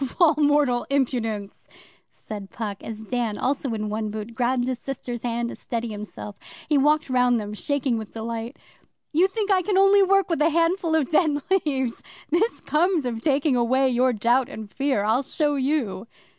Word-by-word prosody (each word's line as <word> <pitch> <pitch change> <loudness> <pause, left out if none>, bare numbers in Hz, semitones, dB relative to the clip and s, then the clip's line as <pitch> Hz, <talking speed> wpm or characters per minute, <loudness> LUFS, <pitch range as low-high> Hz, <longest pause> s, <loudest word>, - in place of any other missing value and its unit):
'E - - +1
eh? - - -1
Of - - -15
all 335 -3 +6
mortal 290 -4 +2
impudence!' 225 -7 -2 0.4
said 205 -3 -9
Puck, 210 -3 -5
as 220 -1 -7
Dan, 230 -2 -2
also 270 -1 -1
in 215 -1 -3
one 215 0 -2
boot, 215 +2 -6
grabbed 245 +1 0
his 255 -1 -2
sister's 245 -3 -5
hand 235 0 -2
to - - -7
steady 235 -1 -4
himself. 210 -1 -8 0.3
He 305 - +2
walked 300 +2 +3
round 250 -2 +3
them, 210 0 -6
shaking 260 +1 -1
with 220 - -7
delight. 230 +3 -5 0.6
'You 345 +5 +4
think 415 +1 -2
I 375 -1 +4
can 380 +2 0
only 390 +1 +6
work 390 -1 +3
with 330 -3 -1
a 315 - +5
handful 335 +1 +1
of 305 -5 +2
dead 305 -3 +2
leaves? 270 -10 0 0.3
This 415 +9 +1
comes 330 -1 +1
of 230 -2 -3
taking 280 -1 +2
away 260 +3 +2
your 255 +1 +2
Doubt 240 +3 +2
and 215 -2 -8
Fear! 270 -7 0
I'll 220 +5 +2
show 295 +2 0
you! 260 -8 -1
255 Hz, 190 wpm, -24 LUFS, 225-300 Hz, 0.6 s, all